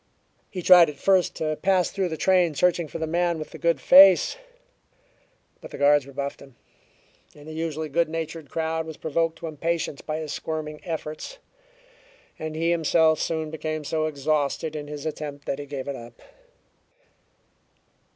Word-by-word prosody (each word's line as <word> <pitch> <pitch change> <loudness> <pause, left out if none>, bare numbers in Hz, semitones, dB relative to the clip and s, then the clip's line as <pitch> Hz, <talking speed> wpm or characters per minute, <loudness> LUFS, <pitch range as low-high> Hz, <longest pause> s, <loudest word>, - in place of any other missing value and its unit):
He 180 -3 -6
tried 180 -2 +8
at 145 - -9
first 190 +2 +2
to 155 -1 -2
pass 185 +1 +1
through 190 -3 -1
the 160 - -4
train 180 -4 +2
searching 175 0 +2
for 160 - -7
the 160 - -2
man 170 +1 0
with 155 - -7
the - - -10
"good 170 -4 +1
face," 185 - +7 1.3
but - - -10
the - - -9
guards 145 -1 +4
rebuffed 140 0 -5
him, 135 -3 -15 0.8
and 150 +1 -14
the 155 - -7
usually 160 -1 -3
good 165 +3 +1
natured 160 -1 -5
crowd 160 0 -2
was 160 - -8
provoked 165 +1 -1
to - - -8
impatience 160 -1 -3
by 155 0 -4
his 155 -2 -5
squirming 155 -1 -5
efforts; 160 - -6 1.0
and 155 0 -5
he 165 +2 +1
himself 160 -1 +3
soon 160 -2 -2
became 155 -1 -4
so 155 +1 -1
exhausted 155 +1 -1
in 145 -1 -5
his 145 -1 -7
attempt 150 -2 -6
that 140 - -3
he 145 - -7
gave 140 -1 -6
it 140 - -3
up. 120 -1 -12
155 Hz, 170 wpm, -25 LUFS, 150-165 Hz, 1.3 s, tried